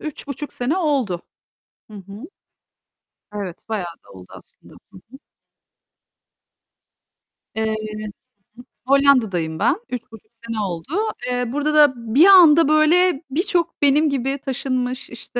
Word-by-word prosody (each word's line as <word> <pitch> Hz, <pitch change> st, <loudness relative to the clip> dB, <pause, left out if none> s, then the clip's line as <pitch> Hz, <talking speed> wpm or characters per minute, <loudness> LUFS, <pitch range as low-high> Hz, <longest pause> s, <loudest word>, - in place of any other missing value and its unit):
3,5 295 Hz, -1 st, -6 dB
sene 260 Hz, +8 st, -2 dB
oldu. 270 Hz, -, -1 dB, 0.7 s
Hı -, -, -13 dB
hı. 200 Hz, +2 st, -11 dB, 1.1 s
Evet, 195 Hz, -3 st, -7 dB
bayağı 180 Hz, -6 st, -4 dB
da -, -, -20 dB
oldu 95 Hz, -1 st, -13 dB
aslında. -, -, -17 dB, 0.2 s
Hı -, -, -15 dB, 0.2 s
hı. 270 Hz, -, -12 dB, 2.4 s
Eee, 220 Hz, -, -1 dB
hı -, -, -1 dB, 0.3 s
hı. 210 Hz, -, -6 dB, 0.8 s
Hollanda'dayım 225 Hz, -, +2 dB
ben. 335 Hz, -, +1 dB
3,5 225 Hz, -3 st, -9 dB
sene 230 Hz, -1 st, -7 dB
oldu. 180 Hz, -4 st, -4 dB, 0.4 s
Eee, 245 Hz, 0 st, -1 dB
burada 295 Hz, +2 st, -1 dB
da 295 Hz, -3 st, +5 dB, 0.2 s
bir 310 Hz, +6 st, +7 dB
anda, 335 Hz, -6 st, +7 dB
böyle, 310 Hz, +1 st, +3 dB
birçok 345 Hz, +2 st, -1 dB
benim 295 Hz, +2 st, +3 dB
gibi 270 Hz, 0 st, -2 dB
taşınmış, 255 Hz, -1 st, -3 dB
işte, 235 Hz, +1 st, -7 dB
265 Hz, 120 wpm, -20 LUFS, 220-300 Hz, 2.4 s, bir